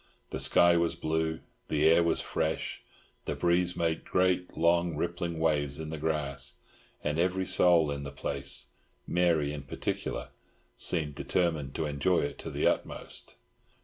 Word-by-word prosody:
The 65 - -3
sky 85 +6 +5
was 85 0 +1
blue, 80 -1 -1 0.3
the 75 0 +2
air 85 +1 +6
was 85 - +2
fresh, - - -2 0.4
the - - -2
breeze 90 +1 +2
made 80 -1 -1
great, 90 0 +1
long, 85 0 +2
rippling 85 0 -2
waves 75 -3 0
in 80 -1 -5
the 80 -1 -5
grass, 75 -3 -1 0.5
and 75 +2 -1
every 95 +2 +1
soul 85 -5 +5
in 70 0 -3
the 70 - -5
place—Mary 70 +3 -1
in 75 - -5
particular—seemed 75 +3 -4
determined 75 -2 -1
to 80 - -1
enjoy 75 +5 +1
it 70 0 -4
to - - -6
the - - -1
utmost. - - -2
80 Hz, 145 wpm, -30 LUFS, 75-85 Hz, 0.5 s, air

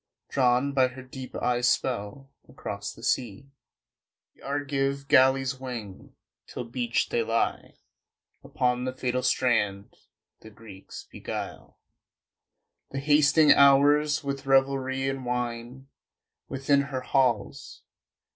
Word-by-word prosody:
Drawn 130 +1 +2
by 130 -2 +4
her 130 +1 -10
deep 130 0 -10
eyes' 120 -1 +1
spell, 125 +3 -2 0.2
across - - -6
the - - -15
sea 125 +2 -2 0.8
The - - -26
Argive 140 0 -2
galleys 130 0 +3
wing, 115 -7 -8 0.3
till - - -6
beached 120 0 -2
they 120 - +1
lie 115 0 -2 0.7
Upon 125 0 -1
the 130 - -3
fatal 125 -1 -2
strand. 105 -6 0 0.4
The 110 - -13
Greeks 105 -3 -12
beguile - - -7 1.1
The 135 - -4
hasting 150 +1 +4
hours 145 +2 +5
with 140 0 -5
revelry 135 0 +1
and 135 -1 -3
wine 125 +1 -4 0.6
Within 140 +1 +1
her 130 -2 -3
halls.... 125 -6 -1
130 Hz, 110 wpm, -26 LUFS, 120-135 Hz, 1.1 s, hours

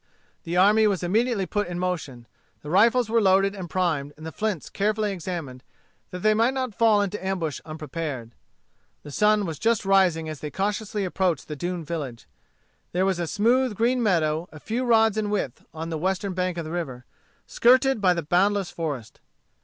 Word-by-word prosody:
The 170 +1 -2
army 210 +4 +5
was 195 -4 0
immediately 215 +2 +1
put 205 +1 -2
in 175 0 -5
motion. 160 -10 -3 0.4
The 150 - -6
rifles 230 +5 +4
were 230 +1 +2
loaded 195 0 +3
and 185 -4 -7
primed, 155 -5 -1
and 155 - -10
the 160 - -5
flints 210 -3 -3
carefully 210 +1 0
examined, 165 -8 -5 0.5
that 180 0 -7
they 215 0 +5
might 230 +5 +2
not 255 -4 -2
fall 215 -2 +4
into 200 0 -4
ambush 180 -7 -2
unprepared. 155 -6 -5 0.7
The 145 - -9
sun 210 +5 +3
was 160 -4 -5
just 225 -2 +1
rising 185 -5 +3
as 155 -2 -6
they 150 - -5
cautiously 205 +3 -2
approached 180 -4 -1
the 150 - -5
doomed 175 +2 -4
village. 140 -8 -5 0.7
There 185 +2 +2
was 190 -2 0
a 170 - -2
smooth 235 +5 +2
green 245 +4 +1
meadow 165 -5 +1
a 155 - -11
few 235 +9 -2
rods 225 -2 +4
in 210 -1 -1
width 185 -12 -3
on 165 +1 -6
the 160 - -2
western 190 +3 -1
bank 180 -1 -2
of 170 - -3
the 155 - -6
river, 130 -8 -5 0.4
skirted 255 0 +3
by 180 -2 +4
the 170 - -2
boundless 190 +4 +1
forest. 145 -9 -5
185 Hz, 185 wpm, -25 LUFS, 160-210 Hz, 0.7 s, army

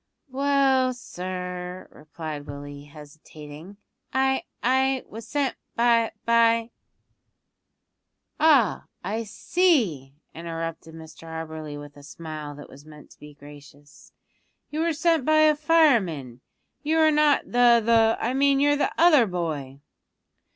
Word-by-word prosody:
"Well, 270 -2 +2
sir," 180 -4 -7
replied 150 -1 -8
Willie, 145 0 -9
hesitating, 150 +3 -13 0.3
"I 265 0 0 0.2
I 265 +1 +1
was 225 +1 -10
sent 280 -1 -1 0.2
by 230 -1 +2
by 230 0 +3 0.8
" - - -54
"Ah, 290 - +3 0.2
I 215 +5 -3
see," 210 - 0 0.2
interrupted 165 0 -7
Mr 160 0 -13
Auberly 160 -2 -7
with 145 0 -12
a - - -13
smile 155 0 -8
that 145 - -11
was 140 - -15
meant 150 -1 -15
to - - -19
be 150 0 -13
gracious, 145 0 -16 0.6
"you 300 - -4
were 330 0 +1
sent 325 -1 +1
by 310 +2 +3
a 305 -1 +5
fireman; 230 - +1 0.4
you 310 +2 0
are 315 -1 +4
not 300 -1 +3
the 240 -1 +4
the 225 -1 +3
I 245 - -1
mean 275 0 +2
you're 290 +1 +3
the - - 0
other 310 -9 +5
boy." 150 -7 -5
200 Hz, 130 wpm, -24 LUFS, -, 0.8 s, a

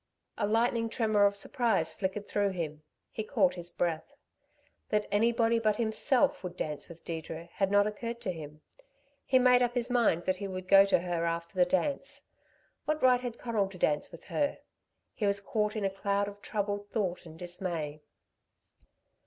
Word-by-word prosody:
A 205 - 0
lightning 230 +1 +2
tremor 215 -3 +3
of 200 - -2
surprise 200 -6 0
flickered 195 +4 -3
through 205 -1 +1
him; 155 -4 -4 0.3
he 220 - -4
caught 205 -6 +2
his 175 -1 -5
breath. 170 -2 -2 0.7
That 210 0 +1
anybody 230 +2 +3
but 215 -2 +2
himself 230 +1 +1
would 180 -1 -6
dance 150 -1 -4
with 170 -1 -13
Deirdre 165 0 -6
had 195 -1 +1
not 205 0 +4
occurred 230 +3 -4
to 200 -6 -2
him. 150 -3 -9 0.7
He 260 - +5
made 250 -1 +5
up 245 0 +1
his 245 0 -1
mind 225 -9 +2
that 185 0 +1
he 200 - -4
would 185 -1 -6
go 195 +1 +8
to 195 - +3
her 175 -2 -2
after 170 +1 -2
the 180 -2 +4
dance. 275 +11 -1 0.6
What 305 -1 -1
right 250 -1 +5
had 240 -2 -5
Conal 220 -5 -1
to 190 - -11
dance 150 -4 +1
with 170 - -12
her? 285 -1 -1 0.6
He 210 - -1
was 200 0 +2
caught 210 +1 -1
in 210 -2 -1
a 195 - +1
cloud 200 +1 0
of 205 0 -9
troubled 205 -1 -3
thought 185 -5 -2
and 160 0 -12
dismay. 170 -4 -4
200 Hz, 180 wpm, -30 LUFS, 175-225 Hz, 0.7 s, go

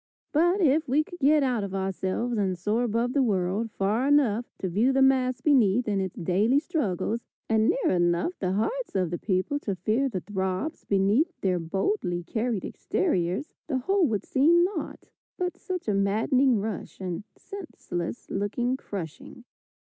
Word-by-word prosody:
But, 350 +6 +3
if 310 -2 +3
we 295 +4 +3
could 355 +3 -12
get 295 +1 +4
out 245 -5 0
of 195 -1 -4
ourselves 190 +5 -2
and 190 -4 0
soar 210 +6 0
above 240 +1 0
the 280 - +3
world, 200 -1 0
far 210 +6 0
enough 250 -6 +3
to 190 - -3
view 215 +9 +2
the 270 0 +3
mass 255 -2 +2
beneath 245 -6 +3
in 200 -2 +1
its 190 -2 -4
daily 195 +9 +2
struggles, 235 - -1 0.3
and 220 0 +3
near - - +1
enough 175 - +1
the 185 -1 -1
hearts 460 - -2
of 185 -3 +1
the 175 - -3
people 195 +8 0
to 200 -9 -3
feel 220 +9 0
the 185 -7 -3
throbs 190 - -3
beneath 205 - +2
their 185 -2 +1
boldly 175 - -1
carried 220 +3 -2
exteriors, 190 - -1
the 275 -4 0
whole 360 +7 +2
would 215 -5 -2
seem 330 +6 +4
naught 355 -5 -4 0.3
but 360 0 -2
such 365 -7 -5
a 210 - +2
maddening 225 +6 +2
rush 210 0 -5
and 185 0 -4
senseless 245 - -6
looking 240 +6 -1
crushing. 185 - -8
225 Hz, 165 wpm, -27 LUFS, 190-275 Hz, 0.3 s, get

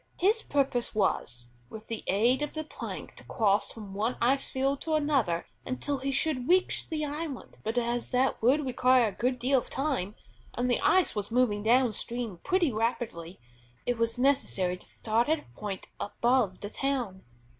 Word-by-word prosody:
His 425 +5 +3
purpose 270 - 0
was, 120 - 0 0.2
with 220 0 -9
the 225 -2 -5
aid 235 +8 +3
of 295 - -3
the 310 - -2
plank 310 - -7
to - - -11
cross 205 -3 +1
from 205 -4 -9
one 220 +5 -1
ice 265 +3 +2
field 270 +1 0
to 320 -1 0
another 270 - +1 0.2
until 270 +2 -2
he 275 +1 -2
should 270 -2 0
reach 370 +1 +2
the 305 -2 -1
island; 295 -2 -5
but 220 +3 -2
as 240 0 0
that 255 +1 +1
would 270 +6 +3
require 255 -2 +4
a - - -11
good 250 +1 0
deal 260 +2 +3
of - - -10
time, 260 -9 -1 0.4
and 245 +1 0
the - - +2
ice 375 -1 +4
was 205 -1 -3
moving 230 -3 +2
down 240 +2 +4
stream 230 -4 -2
pretty 355 -8 +2
rapidly, 215 -6 -2 0.5
it 245 -1 -1
was 230 +1 +1
necessary 250 -9 +1
to 180 - -12
start 230 +4 0
at 315 - +4
a - - -13
point 200 -3 -5
above 235 -1 +1
the 205 - -5
town. 250 -9 -2
245 Hz, 180 wpm, -29 LUFS, 215-275 Hz, 0.5 s, require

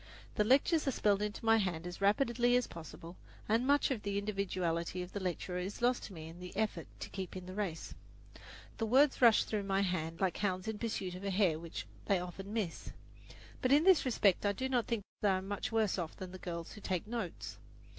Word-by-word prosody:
The 210 - +2
lectures 280 +7 +3
are - - +3
spelled 205 -4 +2
into 210 +2 -3
my 225 0 +6
hand 180 -5 -1
as 180 +2 -7
rapidly 240 +4 +3
as 250 - +3
possible, 165 +1 -10 0.3
and 230 +4 +2
much 285 0 +4
of 240 -5 -1
the 200 -1 -2
individuality 185 -4 -1
of 180 - -9
the 205 - -3
lecturer 180 -1 -3
is 190 +3 -4
lost 245 +1 +2
to 200 - -9
me 160 -2 -8
in 165 +2 -11
the 180 +1 -8
effort 220 -1 -1
to - - -5
keep 190 -2 -5
in 185 -1 -6
the 185 - -7
race. 190 -5 -3 0.9
The 225 - 0
words 265 +5 +4
rush 230 -3 +7
through 215 -2 -2
my 195 0 +1
hand 165 -4 -2
like 190 -2 +1
hounds 185 -2 -1
in 220 -1 -3
pursuit 195 -5 -2
of 180 +2 -8
a 200 - -1
hare 185 -5 +2
which 165 -1 -6 0.2
they 200 - +3
often 180 +3 -7
miss. 210 -7 -3 0.7
But 255 - +1
in 290 +3 +6
this 375 -2 +6
respect 210 -7 +3
I 205 -1 +2
do 260 +6 -2
not 250 -3 +1
think 230 -4 -1 0.2
I - - +5
am 190 +1 -6
much 205 +4 -3
worse 220 -4 +1
off 165 -3 -4
than 185 -1 -7
the 185 - -9
girls 170 -2 -5
who 210 - -10
take 185 -3 -2
notes. 220 -6 -5
200 Hz, 225 wpm, -34 LUFS, 180-225 Hz, 0.9 s, rush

